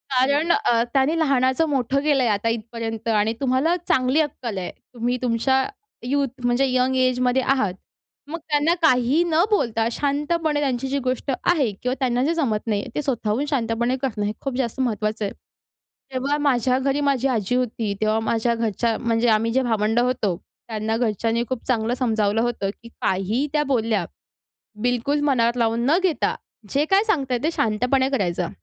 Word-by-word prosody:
कारण 280 +6 +3
अ, 235 -7 +2
त्यांनी 275 +4 +2
लहानाचं 265 0 +2
मोठं 270 0 0
केलं 285 -4 +3
आहे, 235 - +2
आता 205 +3 0
इथपर्यंत. 230 0 -4
आणि 215 +1 +2
तुम्हाला 270 +6 +2
चांगली 260 +4 +3
अक्कल 250 -8 -4
आहे, 180 - -4 0.2
तुम्ही 245 +1 -1
तुमच्या 255 +2 +2 0.4
यूथ, 275 +2 0 0.2
म्हणजे 245 +3 +2
यंग 255 +1 +2
एजमध्ये 255 0 +2
आहात, 255 -8 +1 0.5
मग 330 +3 -4
त्यांना 300 +3 +3
काहीही 270 +1 +3
न 335 0 +2
बोलता, 230 - +1
शांतपणे 295 +3 0
त्यांची 265 -2 -1
जी 280 +1 -1
गोष्ट 255 +2 -1
आहे, 290 -11 +2
किंवा 250 - 0
त्यांना 250 -1 +1
जे 325 +4 +1
जमत 235 -10 -1
नाही, 205 -2 0
ते - - 0
स्वतःहून 250 -1 -1
शांतपणे 235 -2 0
करणं 220 -6 -2
हे 205 - 0
खूप 275 -2 -3
जास्त 250 -1 -2
महत्त्वाचं 215 -4 -1
आहे. 200 - -4 0.8
तेव्हा 275 +3 0
माझ्या 255 -3 +2
घरी 275 +2 0
माझी 275 -2 +1
आजी 235 -3 0
होती, 230 -4 -1
तेव्हा 215 +1 +2
माझ्या 225 +1 0
घरच्या, 230 0 0
म्हणजे 230 0 0
आम्ही 225 +1 +2
जे 265 +3 +2
भावंड 225 -1 +1
होतो, 240 -7 0 0.3
त्यांना 220 0 -2
घरच्यांनी 230 0 0
खूप 255 -3 -3
चांगलं 230 -2 +1
समजावलं 220 -3 +1
होतं, 230 -5 -1
की 230 - -11
काहीही 200 +9 0
त्या 300 -1 +2
बोलल्या, 220 -6 +1 0.8
बिलकुल 245 +4 0
मनात 235 -2 +2
लावून 230 0 +1
न 310 +5 +4
घेता, 360 -5 +1 0.3
जे 290 +2 +1
काय 390 +2 +5
सांगताय, 270 - +1
ते 320 - +1
शांतपणे 250 +2 +1
करायचं. 180 -9 -1
250 Hz, 170 wpm, -22 LUFS, 225-275 Hz, 0.8 s, काय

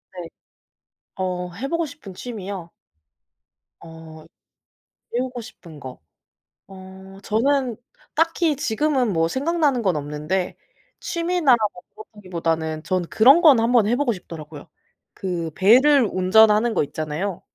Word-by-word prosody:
네. 175 -2 -7 0.9
어 180 -1 -3
해 255 +9 -5
보고 335 +2 -1
싶은 280 -10 -12
취미요? 195 -5 -7 1.1
어 160 -1 -13 0.9
배우고 250 0 -3
싶은 170 -9 -13
거. 130 - -10 0.7
어 190 0 -13
저는 250 +2 0 0.4
딱히 330 -1 +1
지금은 260 -1 0
뭐 165 -1 +1
생각나는 285 - 0
건 190 -6 +1
없는데 150 +5 -3 0.4
취미나 335 -6 +1 0.2
뭐 180 - -13 0.3
그렇다기보다는 165 -6 -3
저는 180 -1 -2
그런 265 +9 +6
건 295 -8 +6
한번 230 -2 +3
해 235 - +2
보고 285 -2 0
싶더라고요. 155 -5 -10 0.5
그 175 -4 -4
배를 255 +7 +5
운전하는 215 +4 +4
거 - - +1
있잖아요. 155 +6 -4
200 Hz, 245 characters per minute, -22 LUFS, 170-260 Hz, 1.1 s, 그런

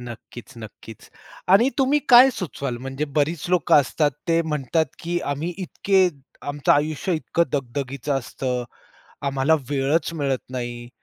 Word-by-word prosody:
-नक्कीच-नक्कीच. 115 -2 -11 0.4
आणि 230 +7 +6
तुम्ही 270 +2 +3
काय 250 +2 +9
सुचवाल 140 - -4
म्हणजे 135 +4 -4
बरीच 150 +2 0
लोकं 180 -2 +3
असतात 145 +2 0 0.2
ते 165 0 +3
म्हणतात 155 0 0
की 175 +1 -2
"आम्ही 155 +5 -3
इतके 190 0 +2 0.4
आमचं 145 -1 +1
आयुष्य 155 +5 0
इतकं 170 +1 0
दगदगीचं 140 +1 -3
असतं. 125 0 -3 0.6
आम्हाला 140 +3 +2 0.2
वेळच 145 +5 0
मिळत 140 -4 -1
नाही 120 -1 -5
145 Hz, 125 wpm, -23 LUFS, 130-170 Hz, 0.6 s, काय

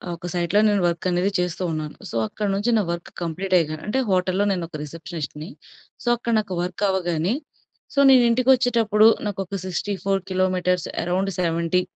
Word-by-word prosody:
ఒక 170 +1 -8
సైట్‌లో 175 +3 +1
నేను 205 -2 +2
వర్క్ 170 +1 -3
అనేది 180 +3 +1
చేస్తూ 180 +1 -2
ఉన్నాను. 155 -1 -4
సో, - - -7
అక్కడ 210 - -3
నుంచి 205 +4 0
నా - - +3
వర్క్ 170 0 -5
కంప్లీట్ 185 +3 -3
అయ్యగా 155 -2 0
అంటే 220 +6 0
హోటల్‌లో 185 +1 +1
నేను 180 -3 -1
ఒక - - -10
రిసెప్షనిస్ట్‌ని. 160 0 -7 0.5
సో, - - -9
అక్కడ 235 0 -2
నాకు 205 -3 -4
వర్క్ 180 +3 -4
అవ్వగానే 175 0 0 0.6
సో, 280 - +1
నేనింటికొచ్చేటప్పుడు 240 -3 +4 0.2
నాకొక 195 -1 -3
64 195 +1 -1
కిలోమీటర్స్ 185 -2 0 0.2
అరౌండ్ 190 +3 0
70 170 +1 +1
185 Hz, 155 wpm, -23 LUFS, 170-205 Hz, 0.6 s, నేనింటికొచ్చేటప్పుడు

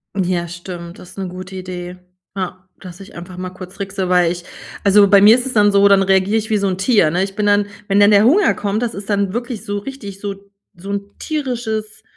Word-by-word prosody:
Ja, 180 -3 -1
stimmt. 175 0 -9
Das 180 - -14
'ne 190 - -3
gute 185 +1 -9
Idee. 180 -1 -7 0.4
Ja, 185 0 -5
dass 180 -1 -11
ich 195 - -13
einfach 180 +1 -9
mal 185 0 -5
kurz 185 0 -11
trickse, 195 -2 -4
weil 180 -2 +3
ich 175 0 -6 0.4
also, 200 0 +6
bei 200 0 +6
mir 215 +3 +8
ist 250 - -3
es 255 - -4
dann 205 -1 +4
so, 200 0 +5
dann 195 -1 +5
reagiere 195 +3 +2
ich 220 +1 -3
wie 215 - +3
so 200 0 0
'n 185 - -1
Tier, 195 -5 +3
ne? 180 +4 0
Ich 195 0 -5
bin 210 -1 -1
dann 205 0 +3 0.2
wenn 200 0 +2
dann 205 +1 +6
der 205 0 +6
Hunger 360 - +4
kommt, 210 +3 -2
das 230 - -2
ist 200 +1 -8
dann 200 -1 0
wirklich 240 -2 -5
so 205 0 -3
richtig 205 -5 -9
so 200 -1 -4 0.4
so 195 +3 -8
'n 200 0 -5
tierisches 240 -8 -4
200 Hz, 235 wpm, -18 LUFS, 185-210 Hz, 0.4 s, mir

